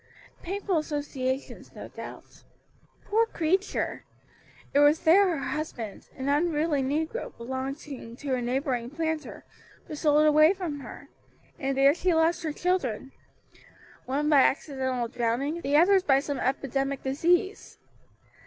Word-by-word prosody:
"Painful 385 -1 -1
associations, 285 -3 -4
no - - -8
doubt. - - -11 0.6
Poor 450 +2 +2
creature! 375 +1 -1 0.7
it 285 - +4
was 290 +2 +5
there 365 +4 +6
her 315 -6 -2
husband 245 -9 -5
an 265 0 -4
unruly 300 0 +1
negro 315 - -3
belonging 260 0 -6
to 275 +1 -4
a 250 - 0
neighboring 245 -1 -1
planter 320 +1 -4 0.4
was 300 - -7
sold 300 0 +4
away 310 +3 +6
from 345 -7 -5
her, 255 - -11 0.5
and 270 -2 -2
there 275 +1 +6
she 350 +1 +1
lost 330 +2 +2
her 320 -3 -2
children, 290 - -1 1.0
one 285 +3 0
by 295 -3 +6
accidental 260 -3 0
drowning, 245 +7 -1
the 285 0 +2
others 380 +4 +5
by 270 -6 +3
some 285 -1 -4
epidemic 275 +1 -1
disease. 345 +9 0
290 Hz, 130 wpm, -27 LUFS, 265-325 Hz, 1.0 s, there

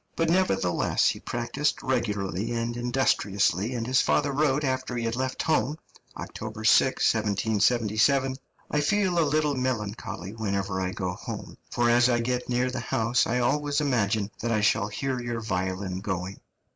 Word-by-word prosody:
But, 165 0 +1
nevertheless, 95 - +2
he - - -3
practised 120 +5 -2
regularly 105 -6 -1
and 115 0 -2
industriously, 120 -3 +1
and 115 -1 -2
his 130 +2 +3
father 145 -1 +1
wrote 145 0 +1
after 130 -2 -1
he 115 - -2
had 115 0 -1
left 130 +1 -2
home 155 -2 +1 0.4
(October 110 0 -7
6, 130 +4 +4
1777): 110 +4 +2 0.4
"I 150 - +2
feel 185 +2 +2
a - - +5
little 150 0 +1
melancholy 110 -7 -3
whenever 100 -3 -2
I 90 - -1
go 95 -1 -3
home, - - -7
for 120 0 +1
as 120 +1 +5
I 120 -1 +2
get 125 +1 -2
near 125 +1 +1
the 125 - -3
house 120 0 +1
I 120 - 0
always 145 +4 +1
imagine 110 -7 0
that 120 - -2
I 110 -2 +2
shall 105 0 +2
hear 130 +5 -3
your 120 -1 -3
violin 95 -2 -2
going." 95 -1 -4
120 Hz, 160 wpm, -26 LUFS, 105-130 Hz, 0.4 s, a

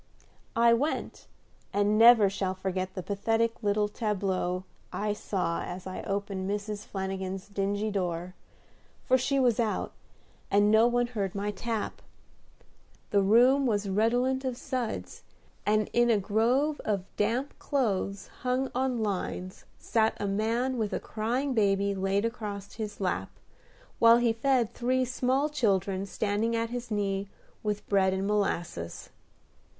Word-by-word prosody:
I 235 0 +5
went, 280 +7 -2 0.4
and 205 +1 +2
never 225 -1 +8
shall 190 -1 -2
forget 185 0 -3
the 185 - -4
pathetic 225 +4 0
little 210 0 +1
tableau 190 -4 -1 0.3
I 210 0 -1
saw 185 -5 -2
as 180 +1 -6
I 185 - -5
opened 195 -1 -3
Mrs. 205 +1 -4
Flanagin's 190 -1 -4
dingy 205 +1 -1
door; 180 -2 -2 0.7
for 255 - +4
she 275 +2 +1
was 245 -4 +3
out, 220 -3 0 0.6
and 205 +1 +4
no 220 +2 +6
one 245 0 +2
heard 205 -5 -3
my 205 +1 -1
tap. 225 +1 -4 1.1
The 200 - +4
room 250 +7 +5
was 205 -3 0
redolent 245 +6 +1
of 255 -2 -2
suds, 255 -4 -4 0.5
and 215 0 +3
in 240 0 +4
a 225 - +4
grove 235 +9 +1
of 200 -4 -1
damp 235 +7 -1
clothes 200 -7 -1 0.2
hung 255 +1 0
on 255 -2 0
lines 185 -2 -4
sat 220 -1 +1
a 205 - -1
man 230 +5 0
with 215 -2 -1
a - - 0
crying 245 +6 -2
baby 200 -2 +2
laid 195 +2 0
across 205 -4 -5
his 215 -2 -6
lap, 180 - -1 0.7
while 230 0 +7
he 240 -1 +2
fed 245 -1 +1
three 255 +1 +1
small 255 +3 +1
children 200 - 0
standing 215 +3 0
at 230 0 -1
his 245 -1 -5
knee 200 -2 -1 0.3
with 210 -1 -3
bread 190 -2 +3
and 190 +1 -2
molasses. 175 - -2
210 Hz, 140 wpm, -29 LUFS, 195-240 Hz, 1.1 s, never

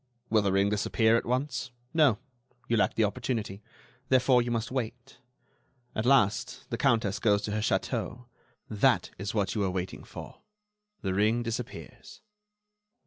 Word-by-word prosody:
Will 110 -1 +5
the 100 -1 +1
ring 100 +1 +3
disappear 110 +2 +2
at 115 - 0
once? 130 +1 -1 0.2
No; 150 -9 +4 0.5
you 120 - +1
lack 110 - +2
the 115 - +3
opportunity. 110 -2 -2 0.5
Therefore, 130 -1 +5
you 120 - -3
must 115 0 -2
wait. 125 0 -5 0.7
At 110 +2 -1
last 105 -7 +2
the - - -1
Countess 110 -4 +2
goes 105 -2 +2
to 105 - -3
her 105 - -1
château. 120 +3 -2 0.4
That 105 -2 +2
is 100 +2 -4
what 100 -3 0
you 105 - -1
were 95 - +1
waiting 90 0 -4
for. - - -10 0.6
The 95 -2 -1
ring 110 +5 +2
disappears." 115 +1 -7
110 Hz, 150 wpm, -29 LUFS, 105-125 Hz, 0.7 s, Will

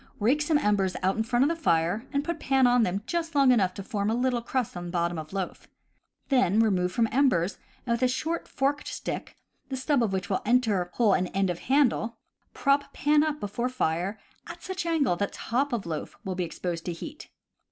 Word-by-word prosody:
Rake 250 +8 +2
some 300 +1 +3
embers 200 -7 +1
out 190 +1 +2
in 220 - 0
front 240 +3 +2
of 285 - +3
the 335 - 0
fire 170 +7 +1
and 280 -1 0
put 335 +1 -3
pan 265 -1 +3
on 245 0 +5
them 195 -1 0
just 330 +1 -3
long 275 -2 +6
enough 190 -7 +2
to 195 - -6
form 205 -2 -2
a 225 - +1
little 245 -1 +1
crust 245 -2 -2
on 175 0 -5
bottom 170 -1 -1
of 155 0 -8
loaf. 190 -2 -4 0.6
Then 220 -7 +3
remove 185 -5 +2
from 225 +4 +2
embers, 215 -9 +2 0.3
and, 245 - -2
with 235 - -2
a 255 - +4
short 320 +6 -2
forked 280 +2 -1
stick, - - -5 0.3
the 265 - -3
stub 270 0 +1
of 225 -4 +1
which 190 +1 -2
will 195 -2 -1
enter 215 -6 +2
hole 220 -5 +3
in 185 -1 +1
end 190 0 0
of 175 - -5
handle, 245 -4 +1 0.4
prop 275 +2 +2
pan 295 +1 +3
up 305 -1 -1
before 235 +5 -2
fire 190 -4 -1 0.3
at - - -9
such 370 -2 -4
angle 290 - +2
that 200 +1 -2
top 270 +5 -1
of 230 -6 -2
loaf 160 -2 -5
will 190 - -2
be 180 -1 -2
exposed 170 0 -4
to 175 - -2
heat. 300 - -9
230 Hz, 215 wpm, -27 LUFS, 185-275 Hz, 0.6 s, long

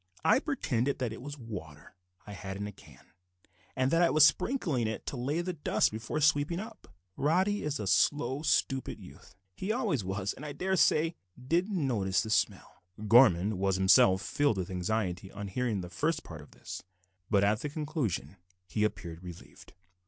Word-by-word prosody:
I 160 - +5
pretended 140 - -1
that 125 -4 -2
it 115 - -9
was 145 +2 -7
water 90 - -9 0.3
I 105 - -8
had 95 0 -6
in 100 - -4
the 105 - -4
can, - - -19 0.6
and 130 +1 +1
that 165 - +3
I 170 - +5
was 155 -1 +7
sprinkling 155 - +1
it 110 - -5
to - - -4
lay 140 +7 -1
the 180 +1 -3
dust 150 -3 +1
before 110 +7 -4
sweeping 150 +3 +2
up. 220 +2 -9 0.3
Roddy 185 +8 +1
is 150 -1 -2
a 105 - -3
slow, 125 +8 +2
stupid 135 -3 0
youth; - - -14 0.2
he 195 - -3
always 215 - 0
was, 95 +1 -2
and, - - -12
I 150 -1 -5
daresay, 170 -3 +2 0.3
did 170 +10 0
not 200 - -2
notice 100 -8 +1
the 110 - -5
smell." - - -1 0.3
Gorman 105 -4 +5
was 95 -1 +1
himself 95 0 +5
filled 145 -8 +1
with 95 0 -3
anxiety 95 0 -2
on 100 -1 -6
hearing 110 -1 -1
the 90 - -7
first 155 - -1
part 80 -3 -9
of 75 - -15
this, - - -8 0.5
but 100 -2 +3
at 105 +1 +2
the 150 - -4
conclusion 135 - -3 0.3
he 105 - -1
appeared 85 -5 -3
relieved. 90 -2 -12
120 Hz, 180 wpm, -30 LUFS, 95-150 Hz, 0.6 s, was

